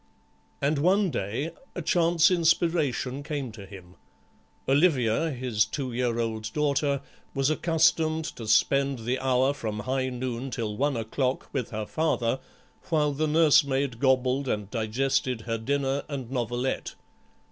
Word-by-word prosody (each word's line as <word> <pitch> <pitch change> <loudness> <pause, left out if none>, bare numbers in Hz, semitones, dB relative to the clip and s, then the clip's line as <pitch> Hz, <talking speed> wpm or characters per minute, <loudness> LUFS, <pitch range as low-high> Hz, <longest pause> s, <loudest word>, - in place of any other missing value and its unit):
And 145 +1 +2
one 190 +4 +3
day 115 - -3 0.2
a 180 - -3
chance 170 +1 +3
inspiration 165 -6 +1
came 145 -4 -4
to 105 -3 -11
him. 90 -2 -13 0.7
Olivia, 140 -1 +3
his 125 -6 0
two 130 -4 -4
year 120 -1 0
old 110 -1 -2
daughter, 140 -2 +1 0.3
was 135 +2 +2
accustomed 160 0 +2
to 115 - -7
spend 135 +1 +2
the 125 +2 0
hour 130 +1 +2
from 110 -6 -4
high 130 +3 -1
noon 125 0 -4
till 110 -4 -3
one 140 +2 0
o'clock 125 +4 -2
with 130 -5 -2
her 110 -1 -4
father 135 -4 0 0.5
while 150 -3 +2
the 155 +2 -1
nursemaid 140 -5 +3
gobbled 130 +1 +2
and 105 -4 -2
digested 125 +1 0
her 115 0 -3
dinner 140 +3 0
and 130 -4 -5
novelette. 120 +1 -2
135 Hz, 135 wpm, -27 LUFS, 115-150 Hz, 0.7 s, one